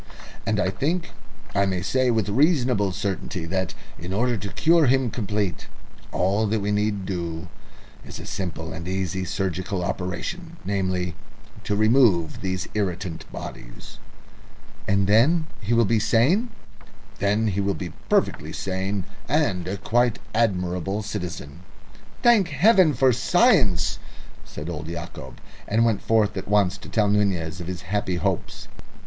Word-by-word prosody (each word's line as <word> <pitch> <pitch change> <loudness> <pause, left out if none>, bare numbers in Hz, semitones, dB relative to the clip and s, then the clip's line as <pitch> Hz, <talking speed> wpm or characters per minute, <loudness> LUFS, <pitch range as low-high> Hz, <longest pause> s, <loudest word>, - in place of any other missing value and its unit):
"And 110 -2 +1
I 95 - +1
think 165 - -1 0.4
I 100 0 +2
may 90 -1 -1
say 130 +5 +2
with 110 -4 +1
reasonable 125 - +2
certainty 95 -1 -3
that, 95 +1 -2 0.2
in 85 +2 -6
order 120 +4 +1
to 100 -1 -4
cure 165 -2 +4
him 130 -2 +2
completely, 105 - -2 0.5
all 100 +4 +1
that 110 +2 +1
we 100 +1 -1
need 105 -1 0
do 85 -2 -4 0.5
is - - -9
a - - -8
simple 80 -3 -4
and 85 +1 -7
easy 95 0 -2
surgical 95 0 -2
operation 130 - -4
namely, 95 -3 -1 0.5
to 105 - 0
remove 110 - +3
these 95 -1 -2
irritant 95 -4 -3
bodies." - - -9 0.9
"And 100 -1 +3
then 130 - +4 0.2
he 105 +2 -3
will 115 -1 +4
be 115 +2 +2
sane?" 125 - +3 0.7
"Then 105 +3 +2
he 100 0 -1
will 100 0 0
be 90 -3 -6 0.2
perfectly - - +1
sane, 95 +1 -2 0.3
and 125 - +1
a 100 +2 -2
quite 120 +4 +1 0.2
admirable 95 -2 0
citizen." 90 -8 -5 0.6
"Thank 230 -6 +6
Heaven 170 - +4
for 130 +1 +4
science!" 140 - +3 0.5
said 75 - -8
old 80 -2 -5
Yacob, 80 -6 -7 0.3
and 115 +3 +3
went 110 -4 +1
forth 110 -2 +2
at 95 - -5
once 100 -2 +3
to - - -11
tell 105 -2 +2
Nunez 95 -4 0
of 85 - -6
his 90 -1 -5
happy 95 -2 -1
hopes. 85 - -2
100 Hz, 145 wpm, -24 LUFS, 90-115 Hz, 0.9 s, Thank